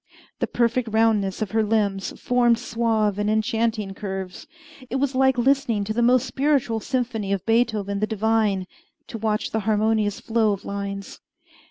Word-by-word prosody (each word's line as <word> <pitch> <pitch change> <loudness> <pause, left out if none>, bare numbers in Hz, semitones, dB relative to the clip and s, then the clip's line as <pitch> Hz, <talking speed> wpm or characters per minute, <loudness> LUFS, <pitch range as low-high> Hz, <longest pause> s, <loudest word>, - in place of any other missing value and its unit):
The - - 0
perfect 235 0 0
roundness 215 -3 +2
of 205 - -6
her 220 0 +2
limbs 205 -3 -1
formed 240 -1 +3
suave 225 -3 0
and 205 0 0
enchanting 220 -1 0
curves. 190 -2 -6 0.4
It - - -3
was 275 0 0
like 265 0 +3
listening 245 -4 +2
to 215 +2 -3
the 240 - 0
most 250 +1 +4
spiritual 265 -3 0
symphony 230 -5 -2
of 195 -3 -1
Beethoven 220 -4 +1
the 215 - 0
divine, 215 -3 +1 0.4
to 225 - -7
watch 215 -1 -1
the 220 - 0
harmonious 215 0 +1
flow 220 -2 +1
of 200 - -7
lines. 200 0 -5
220 Hz, 160 wpm, -23 LUFS, 205-235 Hz, 0.4 s, most